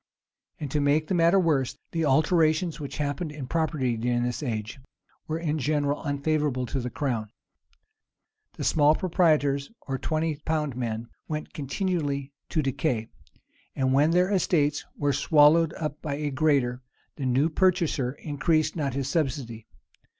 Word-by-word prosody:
And, 145 -4 -5
to 150 - +1
make 145 +2 +2
the 170 - -2
matter 170 +2 +4
worse, 150 -8 +1
the 165 -1 0
alterations 155 +3 +2
which 145 -2 -6
happened 150 +2 -2
in 150 -3 -6
property 150 -5 0
during 120 +1 0
this 120 +3 -2
age, 115 -1 -4 0.5
were 160 - -2
in 155 -2 -1
general 145 0 0
unfavorable 145 -3 0
to 135 - +1
the 125 0 -3
crown. 120 -6 -2 1.2
The - - -6
small 150 0 +4
proprietors, 155 -7 +2
or 135 -1 -4
twenty 155 0 -1
pound 150 -3 -2
men, 115 -2 -3 0.2
went 155 -1 -5
continually 145 -2 -2 0.2
to 155 - 0
decay; 120 -4 -1 0.7
and 130 -1 +1
when 145 +3 +4
their 180 +3 +3
estates 150 -7 +1
were 145 -1 +1
swallowed 155 +3 +5
up 150 -1 -5
by 145 -2 -3
a 145 0 -2
greater, 135 -4 +1 0.4
the 135 -3 -2
new 130 +5 +3
purchaser 170 -7 +1
increased 155 +2 0
not 140 -5 -2
his 135 -1 -2
subsidy. 130 -8 -2
145 Hz, 150 wpm, -26 LUFS, 135-160 Hz, 1.2 s, swallowed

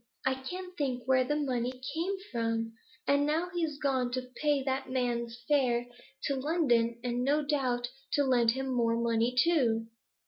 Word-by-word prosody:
I 265 - +3
can't 360 +8 -7
think 260 -6 -1
where 260 0 +4
the 295 +4 0
money 255 -3 -1
came 345 +5 -1 0.2
from! 225 -1 -1 0.3
And 285 0 +4
now 320 +5 0
he's 325 -4 -1
gone 265 -4 +1
to 255 0 -3
pay 295 -3 +1
that 265 0 -2
man's 240 -2 -1
fare 250 -5 +2 0.4
to 280 - 0
London, 250 -6 +2
and 245 0 -1
no 290 +3 +2
doubt 255 -4 0 0.2
to 285 - +4
lend 245 -4 +3
him 265 +1 -3
more 230 -2 +1
money 235 +1 +1
too.' 240 -8 +3
260 Hz, 165 wpm, -31 LUFS, 240-290 Hz, 0.4 s, where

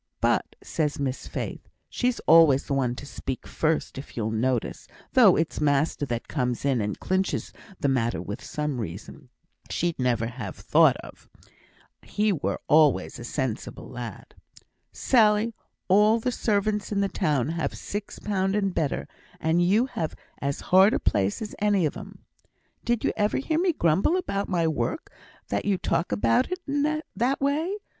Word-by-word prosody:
'But,' - - +1
says 150 -3 -2
Miss 135 -2 -3
Faith - - -6 0.2
(she's 250 -1 -1
always 160 -4 +6
the 140 - -2
one 125 -3 0
to 145 - -8
speak 135 -2 -6
first 155 -3 -1
if 135 - -11
you'll 110 -1 -1
notice, 120 +2 -1 0.3
though - - +7
it's 160 -1 -1
master 145 0 +1
that 120 -1 -3
comes 125 -3 -2
in 135 -5 +2
and 105 0 -3
clinches 190 +1 -1 0.3
the - - +1
matter 120 -8 +1
with 100 +5 -6
some 150 -5 -3
reason 110 - -8 0.4
she'd 170 -3 -1
never 120 -3 +1
ha' 115 -5 -6
thought - - +4
of - - -14 0.7
he 210 0 0
were 150 - -2
always 145 -12 +3
a - - -7
sensible 125 -2 -4
lad), 120 -5 -8 0.6
'Sally, 220 -2 +3 0.3
all 210 +4 +5
the 250 +3 -1
servants 210 -3 0
in 200 -1 +1
the 200 - +2
town 145 -8 0
have 165 -4 -2
six 205 0 -6
pound 195 -1 -1
and 195 -3 0
better, 140 - -1 0.3
and 160 +2 +2
you 200 +7 +3
have 165 -11 -4 0.3
as 140 0 -2
hard 190 +3 +7
a - - 0
place 100 - 0
as 210 - -7
any 205 -4 +2
of 150 - -2
'em.' - - -11 0.6
'Did 240 -2 0
you - - +1
ever 210 0 +1
hear 315 +4 0
me 360 0 +3
grumble 190 - +2
about 200 - -2
my 170 -3 +1
work 160 - -2 0.4
that - - -1
you 200 -2 +2
talk 170 -1 -1
about 250 - +2
it 365 - -1
in 295 +2 0
that 255 +4 +1
way? 305 +7 0
165 Hz, 165 wpm, -26 LUFS, 130-210 Hz, 0.7 s, though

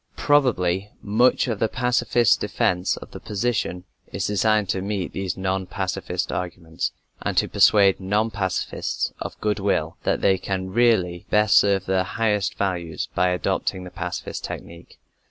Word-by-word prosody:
Probably 105 -10 +2
much 115 +7 +3
of 110 -4 -2
the 110 - +2
pacifist 120 -1 +2
defense 90 0 0
of - - -11
the - - -8
position 105 -4 -2 0.3
is - - -2
designed 105 0 +2
to 95 - 0
meet 100 -2 -3
these 95 -2 -3
non 95 0 -1
pacifist - - -3
arguments, 85 -2 -3 0.3
and - - -2
to - - +4
persuade 100 -2 +5
non 105 +4 0
pacifists 95 -3 -2
of - - -6
goodwill 100 -6 0
that - - 0
they 95 -1 +3
can 95 -1 -3
really 95 -7 +2
best 105 -2 +4
serve 100 -2 +4
their 95 0 +1
highest 105 0 0
values 90 -4 -2
by 90 - +2
adopting 90 +1 -1
the 90 - -9
pacifist 90 -1 -5
technique. 85 0 -8
95 Hz, 150 wpm, -23 LUFS, 90-105 Hz, 0.3 s, persuade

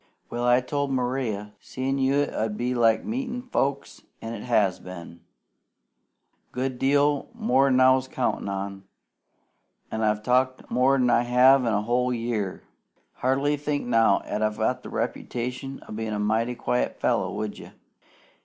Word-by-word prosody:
Well, 120 0 -3
I 125 +1 +4
told 140 +2 -2
Maria 125 -5 -2
seein' 135 +1 -3
you 135 +2 +2
'ud 110 -6 -3
be 125 +1 -1
like 115 -2 +3
meetin' 245 +1 -3
folks, 140 - -2 0.2
an' 115 +1 -6
it 110 - -6
has 105 -6 +1
been. 85 -2 -10 1.3
Good 130 0 -3
deal 145 +1 +2
more'n 140 - +3
I 130 0 +5
counted 125 -6 -2
on, 100 0 -5 1.1
an' 110 - -2
I've 105 -1 +1
talked 130 +1 +1
more'n 130 -1 +3
I - - +4
have 125 +2 +5
in 115 - +1
a 105 0 +1
whole 125 +2 +1
year. 115 -5 -3 0.5
Hardly 140 +3 +1
think 145 0 -2
now 115 -4 +3
'at 105 - -3
I've 110 +4 0
the - - -9
reputation 125 +3 -4
o' - - -10
being 110 0 -3
a 105 - -2
mighty 110 +4 0
quiet 60 - -1
fellow, - - +1
would 105 -1 -4
you?" - - -11
125 Hz, 150 wpm, -25 LUFS, 110-135 Hz, 1.3 s, I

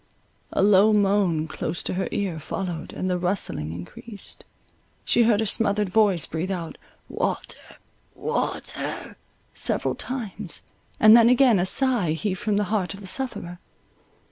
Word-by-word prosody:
A - - +1
low 205 +1 +5
moan 195 -6 +2
close 160 +1 -4
to - - -2
her 190 +1 -2
ear 185 -6 -2
followed, 175 +1 -5
and 185 - -4
the 180 -1 0
rustling 175 - -1
increased; 90 - -11 0.6
she 235 - +3
heard 220 -2 +3
a - - 0
smothered 205 -1 +1
voice 200 -4 +3
breathe 165 +4 -4
out, 175 -4 -5 0.3
Water, - - -3 0.6
Water! - - -4 0.4
several - - -1
times; 215 - -4 0.4
and 215 0 +8
then 235 0 +7
again 250 -4 +5
a 180 - +1
sigh 240 - +2
heaved 185 +2 -3
from 210 -2 0
the 205 - +2
heart 185 -4 -1
of 195 - -12
the - - -10
sufferer. 185 -6 -3
195 Hz, 145 wpm, -24 LUFS, 175-215 Hz, 0.6 s, and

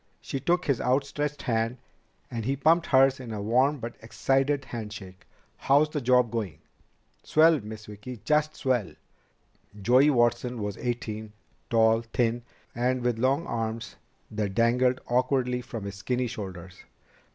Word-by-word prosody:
She 135 - -4
took 175 +6 +1
his 140 -4 +1
outstretched 145 +3 -1
hand, 115 +1 0 0.5
and 115 -2 -3
he 135 +5 0
pumped 160 +5 +3
hers 135 0 +4
in 125 -3 -7
a 105 - -4
warm 130 +8 +2
but 120 -2 -7
excited 135 +4 0
handshake. 105 -6 -8 0.3
"How's 145 +3 +3
the 150 - -2
job 125 -2 +3
going?" 110 -7 -3 0.6
"Swell, 160 0 +4
Miss 110 -1 -9
Vicki! 105 +4 -9
Just 150 0 +2
swell!" 120 - -1 0.9
Joey 125 +8 +5
Watson 120 -1 +1
was 105 -1 -3
eighteen, 110 -3 -4 0.4
tall, 115 0 +4
thin, 115 0 -1 0.3
and 125 +1 0
with 120 -2 0
long 135 +6 +1
arms 115 0 -4 0.4
that 105 -3 -3
dangled 125 +2 +3
awkwardly 125 0 +1
from 115 -3 -7
his 100 -1 -5
skinny 125 +5 -1
shoulders. 95 -6 -7
120 Hz, 140 wpm, -27 LUFS, 110-135 Hz, 0.9 s, Joey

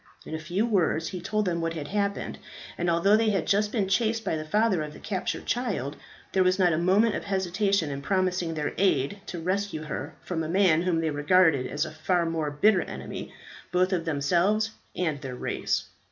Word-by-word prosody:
In - - -7
a 160 - -2
few 175 +7 -1
words 170 -7 +1
he 180 - -6
told 215 +3 -1
them 170 -2 -1
what 165 0 -2
had 145 -3 -5
happened, 200 0 -2 0.4
and 175 0 -1
although 170 +5 +4
they 220 0 +3
had 195 -5 0
just 205 +1 +2
been 210 -5 0
chased 225 +2 +1
by - - 0
the 155 - -3
father 205 +2 +2
of 150 -1 -5
the - - -12
captured 190 -3 -3
child, 200 - -1 0.4
there 190 - +4
was 185 0 +3
not 180 -3 +4
a - - +1
moment 200 +6 +3
of - - -4
hesitation 190 -3 0
in 140 0 -4
promising 185 -1 0
their 150 -1 -2
aid 190 -1 +2
to 175 - -5
rescue 185 -1 -2
her 150 0 -5
from 170 -3 -3
a 155 - -4
man 175 -3 +4
whom 175 -2 +1
they 160 -1 0
regarded 150 -2 +3
as 150 +1 -1
a - - -7
far 170 +2 0
more 165 -2 -1
bitter 180 +6 +3
enemy, - - -7 0.4
both 185 +1 +2
of 170 -2 -1
themselves 175 +9 +1 0.2
and 160 -5 -1
their 130 -3 -5
race. - - -1
180 Hz, 210 wpm, -27 LUFS, 160-200 Hz, 0.4 s, although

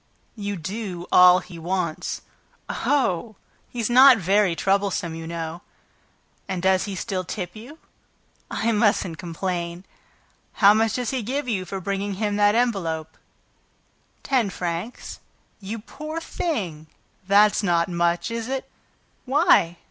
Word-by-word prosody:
"You 205 -2 -4
do 185 0 -5
all 180 0 +7
he 175 -4 -11
wants." 170 -1 -3 0.4
"Oh! 225 -7 0 0.3
He's 235 -3 -2
not 255 +1 +8
very 195 -1 +2
troublesome, 195 -2 0
you 165 0 -7
know." 165 0 -5 0.9
"And 190 -2 -3
does 190 0 +3
he 200 -2 -5
still 190 -1 -3
tip 180 0 -5
you?" 245 +9 -11 0.7
"I 230 +1 0
mustn't 205 -6 +1
complain." 175 0 -4 0.7
"How 205 -4 +6
much 220 0 +2
does 245 -3 -2
he 260 -2 -1
give 265 +5 -3
you 195 -6 -1
for 195 +2 -5
bringing 200 +1 -3
him 205 +1 -1
that 205 0 +4
envelope?" 185 -10 -1 1.1
"Ten 255 -7 +1
francs." 180 +5 -5 0.4
"You 210 +3 -5
poor 305 +8 -7
thing! 190 - -4 0.4
That's 205 +2 +5
not 170 -4 +2
much, 170 +2 0
is 230 0 -3
it? 265 0 -3 0.6
"Why?" 270 - +3
200 Hz, 130 wpm, -24 LUFS, 175-230 Hz, 1.1 s, not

